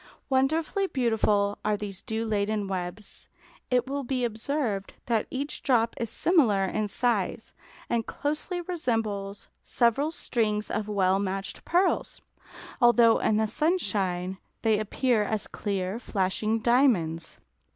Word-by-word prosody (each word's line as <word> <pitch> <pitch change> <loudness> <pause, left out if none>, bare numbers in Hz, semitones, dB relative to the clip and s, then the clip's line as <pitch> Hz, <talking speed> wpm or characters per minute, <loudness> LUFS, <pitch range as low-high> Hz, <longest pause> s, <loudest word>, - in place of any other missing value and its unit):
Wonderfully 315 +9 +1
beautiful 215 - +1
are 210 0 +1
these 200 -3 -6
dew 220 +1 -3
laden 210 -1 0
webs. 185 +2 -5 0.4
It 250 -1 +2
will 280 +1 -2
be 255 0 -1
observed 225 -3 -2
that 230 -2 0
each 280 +3 -3
drop 230 -4 +2
is 230 -2 -2
similar 230 - +3
in 210 +3 -1
size, 225 -1 -1 0.3
and 235 -1 0
closely 305 - -3
resembles 225 - -2
several 245 +5 +2
strings 215 -8 -1
of 210 -1 -2
well 195 -2 +2
matched 195 0 -4
pearls, 360 +3 +1 0.6
although 240 -1 +6
in 215 - +2
the 220 - +2
sunshine 195 - 0 0.2
they 220 -2 +3
appear 225 +2 +1
as 210 0 -1
clear, 195 +1 -3
flashing 215 +1 -1
diamonds. 215 - +2
220 Hz, 125 wpm, -27 LUFS, 200-255 Hz, 0.6 s, although